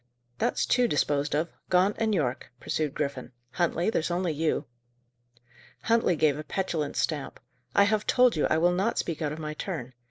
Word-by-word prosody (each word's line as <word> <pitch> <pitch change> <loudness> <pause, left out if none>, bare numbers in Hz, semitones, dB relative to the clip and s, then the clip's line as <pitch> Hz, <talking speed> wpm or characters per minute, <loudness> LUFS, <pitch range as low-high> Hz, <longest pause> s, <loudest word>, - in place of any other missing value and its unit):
"That's - - +1
two 250 -1 +3
disposed 145 -4 0
of, 160 +3 -1 0.2
Gaunt 185 +3 +3
and 225 -1 +1
Yorke," 130 - -1
pursued 150 +1 -2
Griffin. 140 -3 -3 0.2
"Huntley, 175 - 0
there's 165 - 0
only 175 -1 0
you." 155 +2 0 1.2
Huntley 230 -6 +3
gave 150 -2 +2
a - - -5
petulant 160 -4 -2
stamp. 150 -4 -2 0.4
"I 200 - +7
have 210 +1 +1
told 250 -4 +4
you 150 - +2
I 155 - +2
will 175 +2 +3
not 195 +6 0
speak 165 -2 -2
out 150 -2 -1
of 150 - -5
my 155 -1 -4
turn. 150 -7 -5
160 Hz, 180 wpm, -27 LUFS, 150-190 Hz, 1.2 s, I